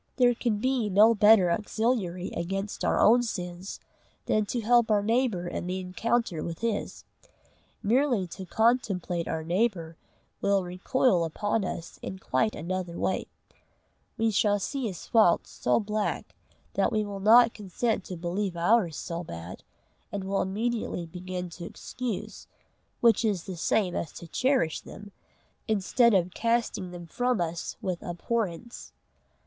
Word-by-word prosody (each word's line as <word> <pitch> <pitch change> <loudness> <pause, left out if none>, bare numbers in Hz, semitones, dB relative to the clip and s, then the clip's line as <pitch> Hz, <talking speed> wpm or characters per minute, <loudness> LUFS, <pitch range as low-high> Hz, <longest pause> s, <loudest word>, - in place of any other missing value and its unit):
There 245 -2 +4
can 235 -2 -1
be 250 -1 0
no 210 +4 +6
better 210 -4 +6
auxiliary 205 -2 -1
against 195 +4 -3
our - - +2
own 240 +3 +6
sins 180 -4 -5 0.5
than 215 -1 +1
to 240 - -2
help 235 +1 +4
our 205 -1 +3
neighbour 225 -5 +1
in 175 - -4
the 185 +1 -2
encounter 185 -1 -1
with 165 -1 -6
his. 230 -3 -2 0.8
Merely 240 -2 +2
to 185 +2 -8
contemplate 195 -7 +1
our 160 - -2
neighbour 170 -2 -1 0.4
will 200 -1 +2
recoil 180 +2 +1
upon 205 +6 -1
us 170 -3 -6
in 190 - -6
quite 215 +3 0
another 175 +1 -4
way: 190 - -1 0.9
we 225 -1 +2
shall 205 0 +3
see 265 +4 -3
his 185 -5 -7
faults 215 -7 +3
so 125 - +1
black, 210 0 -2 0.4
that - - +1
we 215 -1 0
will 200 -1 -6
not 230 +3 +6
consent 210 +1 -2
to 180 - -6
believe 175 +2 -2
ours 175 -2 +2
so 170 0 -4
bad, 85 - -8 0.5
and 200 -1 -3
will 195 +1 0
immediately 215 -2 -2
begin 180 +2 -5
to 170 0 -8
excuse, 245 0 -6 0.5
which 230 -1 +5
is 200 -6 0
the 190 - -6
same 180 +2 +1
as 155 - -3
to - - -9
cherish 250 - +1
them, 205 0 -11 0.6
instead 220 +2 +3
of 180 -1 +1
casting 230 -5 0
them 175 -1 -8
from 245 +6 0
us 170 -1 -3
with 180 -2 -2
abhorrence. 205 +4 -4
200 Hz, 145 wpm, -28 LUFS, 175-230 Hz, 0.9 s, no